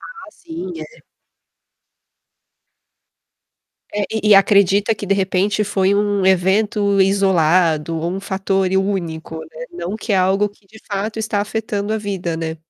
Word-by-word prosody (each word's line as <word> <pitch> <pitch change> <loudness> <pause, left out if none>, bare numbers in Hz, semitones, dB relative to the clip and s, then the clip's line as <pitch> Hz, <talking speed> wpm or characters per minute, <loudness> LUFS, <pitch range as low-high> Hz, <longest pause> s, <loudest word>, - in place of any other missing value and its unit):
Ah 480 -2 -11
sim, 345 +2 -8
é. - - -11 2.9
É, 205 0 -1
e 220 -1 0
e - - +9
acredita 200 +2 +4
que 205 - -7
de 195 - +2
repente 195 +2 0
foi 195 -1 +1
um 205 -1 +1
evento 200 +2 +2
isolado 175 -4 +2
ou 170 +2 -2
um 195 - -4
fator 195 -1 -1
e 190 - +1
único, 170 -5 -2
né, 160 0 -9
não 175 +4 -5
que 220 0 -4
é 195 - +3
algo 190 +3 +2
que 205 0 -26
de 220 +2 -16
fato 210 +2 -3
está 215 -2 -1
afetando 210 0 -3
a 220 - 0
vida, 190 -5 -3
né. 160 0 -4
195 Hz, 150 wpm, -19 LUFS, 185-210 Hz, 2.9 s, e